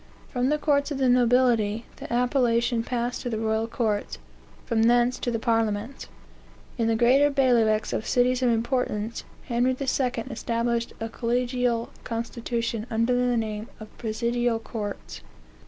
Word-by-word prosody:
From 250 Hz, 0 st, 0 dB
the 300 Hz, -, +2 dB
courts 285 Hz, -1 st, +1 dB
of 290 Hz, -, -3 dB
the 265 Hz, -1 st, +2 dB
nobility, 240 Hz, -3 st, +3 dB
the -, -, -9 dB
appellation 240 Hz, -1 st, +2 dB
passed 240 Hz, +1 st, -2 dB
to 245 Hz, -, -3 dB
the 225 Hz, -, -2 dB
royal 220 Hz, 0 st, 0 dB
courts; 220 Hz, -3 st, -2 dB, 0.5 s
from 230 Hz, -2 st, +1 dB
thence 240 Hz, +2 st, +3 dB
to -, -, -2 dB
the 235 Hz, -, 0 dB
parliaments. 225 Hz, +1 st, -1 dB, 0.7 s
In 230 Hz, -, +2 dB
the 225 Hz, -, +2 dB
greater 255 Hz, +5 st, +4 dB
bailiwicks 235 Hz, -6 st, +2 dB
of 220 Hz, -, -2 dB
cities 250 Hz, +1 st, +2 dB
of 250 Hz, -, +3 dB
importance, 230 Hz, -2 st, -1 dB, 0.2 s
Henry 250 Hz, +1 st, +1 dB
II. 275 Hz, -, -2 dB
established 235 Hz, -2 st, -1 dB
a 225 Hz, -, -3 dB
collegial 240 Hz, 0 st, -1 dB
constitution 230 Hz, -1 st, -3 dB
under 230 Hz, +2 st, +1 dB
the 245 Hz, -1 st, +2 dB
name 215 Hz, -1 st, -3 dB
of 215 Hz, -1 st, -12 dB
presidial 235 Hz, +1 st, 0 dB
courts... 205 Hz, -, -6 dB
235 Hz, 145 wpm, -26 LUFS, 225-250 Hz, 0.7 s, greater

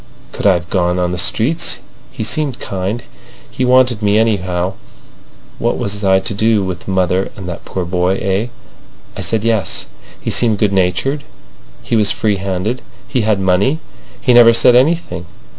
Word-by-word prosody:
Could -, -, -1 dB
I've 90 Hz, -3 st, +2 dB
gone 90 Hz, -1 st, +1 dB
on 90 Hz, -1 st, 0 dB
the 90 Hz, -, -3 dB
streets? 135 Hz, -, +1 dB, 0.3 s
He 130 Hz, -4 st, -5 dB
seemed 140 Hz, +3 st, -1 dB
kind. 100 Hz, +5 st, -3 dB, 0.5 s
He -, -, -2 dB
wanted 125 Hz, -2 st, +4 dB
me, 105 Hz, 0 st, +3 dB
anyhow. 95 Hz, -5 st, 0 dB, 0.9 s
What -, -, 0 dB
was 105 Hz, +1 st, -4 dB
I 95 Hz, -1 st, +4 dB
to 95 Hz, -, -4 dB
do 110 Hz, 0 st, +2 dB
with 90 Hz, -2 st, -5 dB
mother 95 Hz, 0 st, 0 dB
and 95 Hz, -3 st, -8 dB
that 85 Hz, -, -7 dB
poor 95 Hz, -2 st, -3 dB
boy? 90 Hz, +1 st, +1 dB
Eh? 100 Hz, +4 st, 0 dB, 0.7 s
I -, -, -5 dB
said 110 Hz, -2 st, -1 dB
yes. 110 Hz, -4 st, 0 dB, 0.3 s
He -, -, -3 dB
seemed 115 Hz, -3 st, +2 dB
good 100 Hz, -1 st, +1 dB
natured, 95 Hz, +10 st, 0 dB, 0.6 s
he -, -, -1 dB
was 105 Hz, -2 st, +3 dB
freehanded, 100 Hz, +3 st, -1 dB, 0.3 s
he 130 Hz, -, 0 dB
had 110 Hz, -2 st, +1 dB
money, 95 Hz, +10 st, +2 dB, 0.4 s
he 125 Hz, -, +2 dB
never 120 Hz, -1 st, +8 dB
said 120 Hz, +1 st, +5 dB
anything. 150 Hz, -, +1 dB
100 Hz, 160 wpm, -16 LUFS, 95-120 Hz, 0.9 s, never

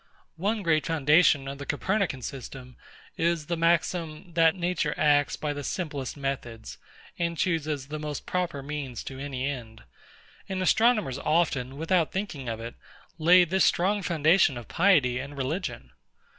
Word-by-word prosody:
One 205 Hz, +4 st, -1 dB
great 155 Hz, -3 st, +2 dB
foundation 150 Hz, -2 st, +4 dB
of 140 Hz, 0 st, -6 dB
the 140 Hz, -, -6 dB
Copernican 180 Hz, -, -1 dB
system 130 Hz, -1 st, -8 dB, 0.4 s
is 165 Hz, -2 st, 0 dB
the 170 Hz, -, -2 dB
maxim, 165 Hz, 0 st, 0 dB
That 165 Hz, 0 st, +4 dB
Nature 175 Hz, -4 st, -1 dB
acts 145 Hz, -1 st, +3 dB
by 150 Hz, -1 st, -3 dB
the 145 Hz, 0 st, -6 dB
simplest 145 Hz, -6 st, -4 dB
methods, 125 Hz, -5 st, -5 dB, 0.4 s
and 170 Hz, -1 st, -1 dB
chooses 155 Hz, -5 st, -1 dB
the 155 Hz, 0 st, -4 dB
most 150 Hz, -2 st, -5 dB
proper 170 Hz, -6 st, -2 dB
means 140 Hz, -4 st, -5 dB
to 135 Hz, -1 st, -8 dB
any 135 Hz, -2 st, -4 dB
end; 120 Hz, -5 st, -6 dB, 0.7 s
and 190 Hz, -1 st, -2 dB
astronomers 210 Hz, -, +2 dB
often, 140 Hz, -5 st, 0 dB
without 165 Hz, +1 st, +1 dB
thinking 170 Hz, -, -4 dB
of 115 Hz, -1 st, -4 dB
it, 115 Hz, +1 st, -7 dB, 0.5 s
lay 180 Hz, +3 st, +7 dB
this 185 Hz, +2 st, +1 dB
strong 200 Hz, +4 st, +2 dB
foundation 160 Hz, -4 st, +3 dB
of 120 Hz, -, -9 dB
piety 155 Hz, -10 st, +3 dB
and 140 Hz, +2 st, -7 dB
religion. 135 Hz, -, -4 dB
155 Hz, 150 wpm, -27 LUFS, 135-175 Hz, 0.7 s, lay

